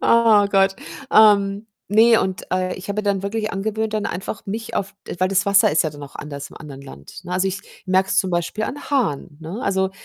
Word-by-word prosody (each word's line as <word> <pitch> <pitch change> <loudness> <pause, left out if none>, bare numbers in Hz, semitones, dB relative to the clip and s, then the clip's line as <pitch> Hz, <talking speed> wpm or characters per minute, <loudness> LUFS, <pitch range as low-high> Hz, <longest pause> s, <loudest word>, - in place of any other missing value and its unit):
Oh 225 -3 +5
Gott. 195 -1 +3 0.4
Ähm, 205 -1 +5 0.2
ne, 225 +2 +5
und, 190 -1 -3
äh, 185 0 0
ich 190 +2 -10
habe 200 +1 -3
mir - - -11
dann 200 -1 0
wirklich 215 +2 -3
angewöhnt, 220 +2 -2
dann 215 0 -1
einfach 190 +2 -5
mich 220 +3 -5
auf 200 +1 -3
d - - -5
weil 185 - +3
das 195 +1 +1
Wasser 200 -4 +5
ist 160 - +3
ja 155 - -1
dann 145 0 -11
auch 140 - -10
anders 145 -1 -7
im - - -14
anderen 140 -3 -10
Land, 70 - -12
ne, 180 - -6
also 190 +1 +1
ich 195 +1 -4 0.3
merke 190 +1 +2
es 190 - +2
zum 190 - +1
Beispiel 175 +5 -1
an 285 +5 -5
Haaren, 150 - -1
ne? 175 +9 -6
Also, 190 -3 0
195 Hz, 235 wpm, -21 LUFS, 180-215 Hz, 0.4 s, Oh